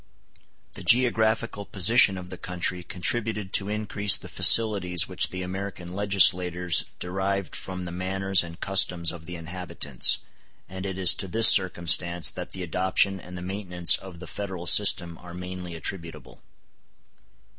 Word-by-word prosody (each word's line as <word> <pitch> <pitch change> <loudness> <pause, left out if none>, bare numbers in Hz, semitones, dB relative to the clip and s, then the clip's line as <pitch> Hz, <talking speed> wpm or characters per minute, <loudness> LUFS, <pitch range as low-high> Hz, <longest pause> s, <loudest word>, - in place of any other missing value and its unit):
The - - -9
geographical 115 -3 +1
position 100 +1 +3
of 90 0 -11
the - - -8
country 90 0 -3
contributed 105 +3 -2
to 100 0 +1
increase 105 -1 +2
the 90 - -11
facilities 95 -1 +3
which - - -1
the 95 0 -7
American 90 -1 -8
legislators 90 -3 +2
derived 95 0 -4
from 90 -1 -7
the 85 - -8
manners 95 +1 -1
and 85 0 -12
customs 90 -3 +2
of 80 -2 -12
the 90 - -8
inhabitants; 85 -6 -2 0.5
and 95 +1 -8
it 95 -1 -6
is 95 -2 +6
to 95 - -5
this 110 +5 +7
circumstance 85 -2 +2
that - - -9
the 95 - -8
adoption 95 +3 -1
and 90 +1 -11
the 90 - -9
maintenance 90 -3 +1
of 95 -3 -11
the 90 - -11
Federal 95 -2 -8
system 85 -3 +3
are 90 -1 -12
mainly 90 -1 -8
attributable. 80 -3 -7
90 Hz, 145 wpm, -24 LUFS, 90-100 Hz, 0.5 s, this